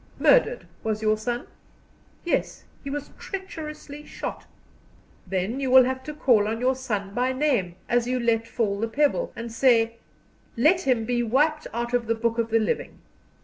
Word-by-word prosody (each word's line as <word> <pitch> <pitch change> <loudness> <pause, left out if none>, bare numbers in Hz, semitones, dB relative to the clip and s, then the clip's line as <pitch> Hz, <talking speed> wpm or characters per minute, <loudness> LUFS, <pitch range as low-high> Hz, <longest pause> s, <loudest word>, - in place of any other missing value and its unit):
Murdered, - - +4 0.2
was 220 0 -2
your 215 0 +3
son?" 240 +3 -3 0.8
"Yes, 345 - -1 0.2
he 280 - -5
was 290 0 -5
treacherously 305 -6 -7
shot." - - -7 0.8
"Then 195 +7 -2
you 270 -2 -1
will 260 0 +8
have 260 +1 -2
to 300 - -5
call 230 -8 +3
on 225 +1 -2
your 255 +2 +2
son 210 -7 -4
by 250 +3 +1
name, 255 - 0
as 240 0 +1
you 255 0 0
let 230 -1 +1
fall 210 -4 -1
the 225 - 0
pebble, 295 - +1
and 230 0 -6
say: 230 -2 +3 0.6
'Let 320 +10 +4
him 240 -4 +2
be 240 +1 0
wiped 300 +7 +1
out 235 +1 -3
of 240 -2 +1
the 230 - +1
book 230 +1 -1
of 230 0 0
the 225 - +3
living. 215 -2 -1
245 Hz, 175 wpm, -25 LUFS, 225-275 Hz, 0.8 s, will